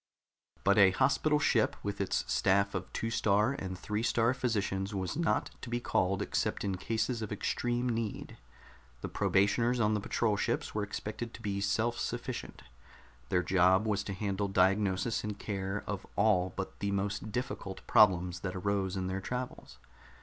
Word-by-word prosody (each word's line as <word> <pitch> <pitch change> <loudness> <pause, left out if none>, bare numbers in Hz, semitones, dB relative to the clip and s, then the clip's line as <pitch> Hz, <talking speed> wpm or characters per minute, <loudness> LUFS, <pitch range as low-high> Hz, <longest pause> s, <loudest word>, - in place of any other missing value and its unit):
But 100 +2 +4
a 100 -1 +8
hospital 150 +9 +2
ship, 135 -6 +2
with 100 -1 -3
its 95 - 0
staff 100 +1 +2
of 95 -1 -4
Two 115 - -3
star 105 +3 +2
and 95 -8 -5
Three 105 +4 -2
star 115 +1 +2
Physicians, 100 -5 -1
was 95 -2 -2
not 165 +2 0
to 125 - -7
be 120 0 -1
called 95 -5 0
except - - -1
in 100 -2 -1
cases 115 +4 -1
of 110 - -4
extreme 120 +4 -1
need. 115 -3 -3 0.7
The - - -4
probationers 115 +5 +2
on 110 -1 +3
the 105 - +1
patrol 105 +1 0
ships - - -1
were 105 - -1
expected 105 +3 -5
to - - -12
be 100 -2 -2
self 110 +4 0
sufficient. - - -4 0.7
Their 90 - +2
job 95 +3 +4
was 105 -2 0
to 100 - -3
handle 100 0 -1
diagnosis 95 +2 +2
and 105 -1 -4
care 100 -1 -3
of 100 -2 -5
all 95 -3 +3
but 95 - -5
the 100 - -1
most 100 +2 -2
difficult 105 -5 -4
problems 90 -4 +4
that 95 +1 -4
arose 95 0 -1
in 95 - -2
their 95 +1 -2
travels. 125 +5 -5
100 Hz, 170 wpm, -31 LUFS, 95-115 Hz, 0.7 s, a